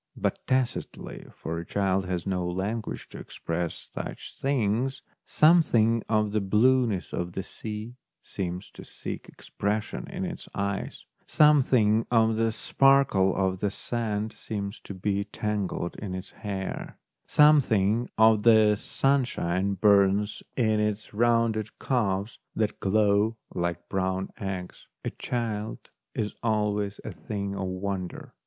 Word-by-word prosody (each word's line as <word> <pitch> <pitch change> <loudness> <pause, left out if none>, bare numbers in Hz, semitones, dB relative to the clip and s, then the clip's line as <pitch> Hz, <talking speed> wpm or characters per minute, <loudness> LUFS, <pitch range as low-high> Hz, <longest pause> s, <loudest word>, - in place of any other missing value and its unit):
But - - -1
tacitly, 130 -2 -2
for 85 +1 -5
a - - -5
child 95 0 0
has 90 -2 -2
no 95 -2 -1
language 100 +5 -3
to - - -9
express 85 0 -4
such - - -6
things, 130 0 0 0.2
something 120 -9 +4
of 105 -2 +2
the 105 0 +1
blueness 110 +1 +2
of 90 0 -3
the 95 - -3
sea 110 +3 -7 0.3
seems 90 -1 -5
to - - -11
seek - - -7
expression 105 +1 -3
in 190 0 -3
its 175 -1 -7
eyes, 100 0 -3 0.2
something 125 -7 +4
of 115 -2 +3
the 115 0 +1
sparkle 135 -7 +3
of 95 -1 0
the 105 - +1
sand 110 0 -3
seems 105 -1 -5
to 100 - -7
be 100 +1 -1
tangled 100 -4 -3
in 95 -3 -5
its 95 +1 -7
hair, 95 -2 -5 0.3
something 120 -7 +4
of 110 -1 +6
the 110 -2 +6
sunshine 100 -9 0
burns 100 +1 +3 0.2
in 110 -4 +2
its 105 0 -2
rounded 115 -1 +1
calves 105 -5 -1 0.2
that 110 -2 -1
glow 105 +2 +2 0.2
like 85 0 -2
brown 95 0 -1
eggs. 95 -2 -5 0.2
A - - -1
child 110 -3 -4 0.2
is 105 -1 -2
always 105 -2 0
a - - -5
thing 100 -2 -4
of 95 -1 -3
wonder. 95 0 -4
105 Hz, 130 wpm, -27 LUFS, 95-115 Hz, 0.3 s, of